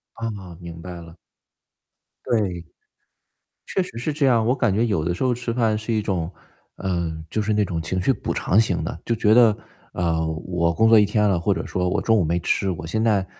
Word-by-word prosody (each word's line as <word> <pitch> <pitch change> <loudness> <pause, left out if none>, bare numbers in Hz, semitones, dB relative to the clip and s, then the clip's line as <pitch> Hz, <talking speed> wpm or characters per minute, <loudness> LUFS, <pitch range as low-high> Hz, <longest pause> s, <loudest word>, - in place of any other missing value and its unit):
哦， 100 -6 -6
明 85 -1 -9
白 90 +1 -8
了。 85 0 -13 1.1
对， 95 -7 0 1.0
确 190 - 0
实 180 -10 -8
是 150 +6 -2
这 145 -1 +1
样。 115 -4 +3
我 125 - +3
感 120 -6 +1
觉 110 +4 +2
有 100 -9 0
的 85 +1 0
时 90 - -5
候 130 -1 +2
吃 120 -1 -4
饭 115 -3 +1
是 110 +2 -3
一 110 - +1
种 90 -5 -2 0.5
呃， 85 -3 -2 0.2
就 110 - -1
是 105 +1 0
那 105 0 +2
种 85 -3 -3
情 95 +3 -2
绪 135 - +3
补 - - -3
偿 100 - +2
型 90 -7 0
的， 80 - -5
就 115 - 0
觉 110 -1 +3
得， 115 -3 +6 0.4
呃， 80 -2 0 0.2
我 85 -2 +1
工 110 +6 +3
作 115 -1 +7
一 105 - +6
天 105 +1 +1
了 90 -4 +1
或 85 - +1
者 - - -4
说 90 -1 -1
我 90 - 0
中 115 - +3
午 100 - +2
没 85 +2 0
吃， 95 +2 0
我 85 -2 -5
现 110 +7 -1
在 105 -4 +2
100 Hz, 240 characters per minute, -23 LUFS, 85-115 Hz, 1.1 s, 作